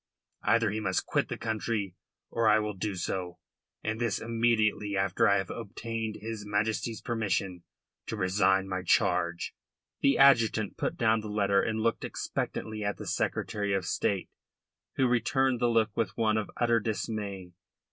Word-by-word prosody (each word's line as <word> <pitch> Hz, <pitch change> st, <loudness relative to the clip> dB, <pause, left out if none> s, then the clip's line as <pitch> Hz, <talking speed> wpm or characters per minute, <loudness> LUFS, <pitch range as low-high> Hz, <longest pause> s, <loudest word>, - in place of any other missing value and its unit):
Either 115 Hz, -2 st, +3 dB
he 110 Hz, -, -2 dB
must 95 Hz, -3 st, 0 dB
quit -, -, 0 dB
the -, -, -3 dB
country, 110 Hz, -4 st, -2 dB, 0.4 s
or 115 Hz, -1 st, +1 dB
I 105 Hz, -, +6 dB
will 105 Hz, -1 st, -1 dB
do 100 Hz, +1 st, -3 dB
so, 90 Hz, 0 st, -3 dB, 0.5 s
and 110 Hz, +1 st, -2 dB
this 115 Hz, -4 st, +1 dB
immediately 110 Hz, -3 st, +1 dB
after 95 Hz, -1 st, +2 dB
I 100 Hz, -, +4 dB
have 95 Hz, -1 st, -3 dB
obtained 115 Hz, 0 st, -4 dB
his 110 Hz, -1 st, -5 dB
Majesty's 110 Hz, +2 st, -1 dB
permission 100 Hz, -6 st, -1 dB, 0.5 s
to 110 Hz, -, -3 dB
resign 95 Hz, -1 st, +2 dB
my 95 Hz, -1 st, -2 dB
charge.'" 85 Hz, -1 st, +1 dB, 0.5 s
The 140 Hz, -, +4 dB
adjutant 115 Hz, -6 st, +4 dB
put -, -, -2 dB
down 110 Hz, 0 st, +3 dB
the 110 Hz, -, -6 dB
letter 100 Hz, -1 st, +2 dB
and 110 Hz, -1 st, -1 dB
looked 115 Hz, 0 st, 0 dB
expectantly 110 Hz, -1 st, -3 dB
at 100 Hz, 0 st, -1 dB
the -, -, -7 dB
Secretary 100 Hz, -1 st, -1 dB
of 95 Hz, -2 st, -1 dB
State, 95 Hz, +1 st, -1 dB, 0.6 s
who 135 Hz, -, +3 dB
returned 125 Hz, +1 st, +2 dB
the 120 Hz, -, +2 dB
look 115 Hz, -2 st, +2 dB
with 105 Hz, -4 st, -1 dB
one 110 Hz, -2 st, +2 dB
of 110 Hz, -1 st, -1 dB
utter 120 Hz, -1 st, +3 dB
dismay. 105 Hz, -4 st, -4 dB
110 Hz, 160 wpm, -29 LUFS, 100-115 Hz, 0.6 s, I